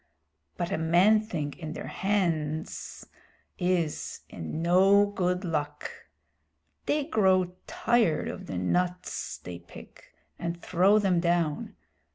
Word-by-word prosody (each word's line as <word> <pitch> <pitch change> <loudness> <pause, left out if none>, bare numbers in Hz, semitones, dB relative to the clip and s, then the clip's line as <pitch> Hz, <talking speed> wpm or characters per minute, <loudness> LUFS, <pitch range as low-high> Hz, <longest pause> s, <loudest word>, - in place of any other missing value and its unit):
But 175 +1 -2
a 195 - 0
man 175 +7 +5
thing 155 -10 -4
in 155 -2 -5
their - - -6
hands 165 -6 -2 0.5
is 175 -4 -1
in 80 - -5
no 195 +4 +5
good 185 -2 -1
luck. 150 -3 -3 1.0
They 295 0 +2
grow 190 - +2 0.2
tired 230 -10 +1
of - - -6
the 95 - -4
nuts 180 - -1
they 85 -1 -8
pick, 85 - -14 0.3
and 170 0 -3
throw 185 +5 +3
them 190 -4 +2
down. 170 -3 0
175 Hz, 120 wpm, -28 LUFS, 160-195 Hz, 1.0 s, man